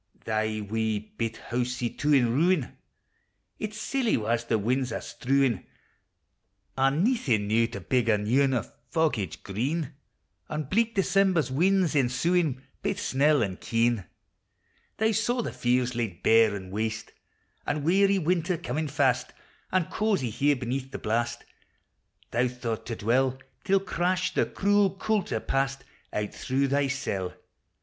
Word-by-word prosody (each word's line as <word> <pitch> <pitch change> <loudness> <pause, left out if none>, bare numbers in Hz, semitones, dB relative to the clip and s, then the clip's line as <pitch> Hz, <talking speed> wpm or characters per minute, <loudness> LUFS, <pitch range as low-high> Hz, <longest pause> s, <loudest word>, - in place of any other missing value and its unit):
Thy 110 -1 -1
wee 110 0 0 0.2
bit 115 -1 -2
housie, 125 0 -2
too, 145 +1 -1
in 120 -5 +4
ruin! 165 0 +2 0.8
Its 215 0 -4
silly 245 +1 0
wa's 115 +1 -1
the 115 -1 +1
win's 125 +4 0
are - - -2
strewin'! 135 -2 0 1.1
An' 135 +5 +2
naething 135 - +1
now 115 +2 +3
to 120 - -7
big 125 -3 +1
a 105 - +4
new 110 +7 +2
ane 135 -2 +2
O' 120 - 0 0.3
foggage 135 - -1
green! 135 - -2 0.6
An' 155 0 -2
bleak 225 - 0
December's 190 -7 +2
winds 180 +4 +2
ensuin', 140 +2 +1 0.2
Baith - - -1
snell 145 0 +3
and 95 -3 -4
keen! 115 -3 +1 0.9
Thou 220 +1 +2
saw 235 +3 0
the - - -4
fields 125 0 +1
laid 110 -7 -3
bare 110 -2 +5
an' 95 -2 -8
waste, 110 +2 -3 0.6
An' 145 0 -1
weary 195 +4 +4
winter 175 0 0
comin' 155 0 -3
fast, 135 -3 +1 0.4
An' 185 -2 +2
cozie 200 - 0
here, 145 +6 +2
beneath 130 +1 -3
the 135 - -6
blast, 120 +1 -2 0.9
Thou 120 +2 +2
thought 120 -3 -4
to 115 - -3
dwell, 125 +4 +1 0.3
Till, 195 -1 +3
crash! 185 0 -1
the - - +1
cruel 200 -1 +2
coulter 210 -1 0
past 135 0 -1 0.3
Out 105 -1 -3
through 135 +1 0
thy 140 +1 +2
cell. 100 -9 -3
130 Hz, 145 wpm, -27 LUFS, 115-170 Hz, 1.1 s, bare